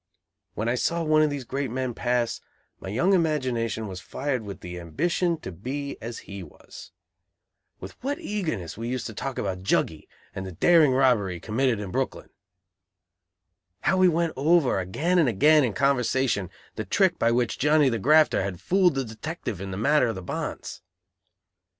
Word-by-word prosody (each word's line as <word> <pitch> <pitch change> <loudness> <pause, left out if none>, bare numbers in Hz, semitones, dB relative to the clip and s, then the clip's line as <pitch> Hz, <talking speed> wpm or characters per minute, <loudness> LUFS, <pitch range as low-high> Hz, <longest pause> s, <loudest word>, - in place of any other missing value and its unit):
When 110 - -2
I 120 - +2
saw 170 +7 0
one 155 -1 +4
of 155 - +3
these 145 -2 -4
great 135 +2 -3
men 130 +1 -2
pass, 120 0 -1 0.4
my 95 - -7
young 155 - +2
imagination 130 - 0
was 95 -1 -7
fired 130 +9 -3
with 100 -2 -8
the 90 0 -7
ambition 170 - -1
to 95 - -6
be 140 - -5
as 115 +1 -6
he 100 -1 -7
was! 80 -5 -13 0.9
With 95 - -8
what 285 +2 -1
eagerness 175 - -4
we 115 +2 -5
used 125 -1 -3
to 110 - -6
talk 135 +4 -5
about 95 -2 -3
"Juggy," 80 -4 0 0.3
and 95 - -5
the 95 -1 -7
daring 155 - +5
robbery 120 -8 +2
he - - -8
committed 115 +2 0
in 100 -3 -5
Brooklyn! - - -3 1.5
How 190 - +2
we 185 0 +5
went 170 -1 +1
over 145 - +3
again 155 - 0
and 150 -7 +4
again 150 +8 +5
in 120 -5 0
conversation, 130 -7 +1 0.3
the - - -2
trick - - +2
by 115 - +3
which 120 -1 0
Johnny 150 0 +4
the 115 -3 0
"grafter" 155 +4 +4
had 95 -2 -4
fooled 185 -4 +2
the 135 -1 -1
detective 110 - -6
in 100 - -5
the 95 - -5
matter 140 +4 +3
of 115 - -2
the 95 - -7
bonds! - - -5
125 Hz, 180 wpm, -25 LUFS, 100-155 Hz, 1.5 s, daring